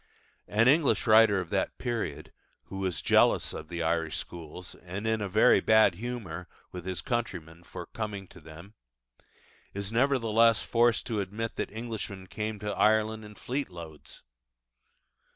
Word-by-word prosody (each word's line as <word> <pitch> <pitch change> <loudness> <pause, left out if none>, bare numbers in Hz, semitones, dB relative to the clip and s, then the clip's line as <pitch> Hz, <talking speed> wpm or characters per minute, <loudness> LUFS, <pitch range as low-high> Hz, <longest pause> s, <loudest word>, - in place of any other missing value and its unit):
An 110 +3 +3
English 145 +1 +3
writer 110 -3 +6
of 90 -3 -6
that - - -1
period, 110 - -4 0.3
who 95 - -8
was 90 -6 -2
jealous - - +3
of 75 - -7
the 85 0 -4
Irish 80 -1 0
schools 85 +1 -8
and 95 +4 -6
in 110 -3 0
very 110 +6 +5
bad 110 -3 +5
humour 95 -5 -6 0.2
with 90 0 -8
his 95 -1 -3
countrymen 85 - -3
for - - -8
coming 105 -3 -5
to 90 - -15
them, 80 +6 -13 1.0
is 100 +1 -4
nevertheless 115 -3 +3
forced 120 -1 +2
to 110 -4 -1
admit 105 +4 -4
that - - -2
Englishmen 110 -4 -6
came 105 +3 -4
to 105 0 -4
Ireland 110 0 +2
"in 105 0 -12
fleetloads." 90 - -6
105 Hz, 145 wpm, -29 LUFS, 90-115 Hz, 1.0 s, writer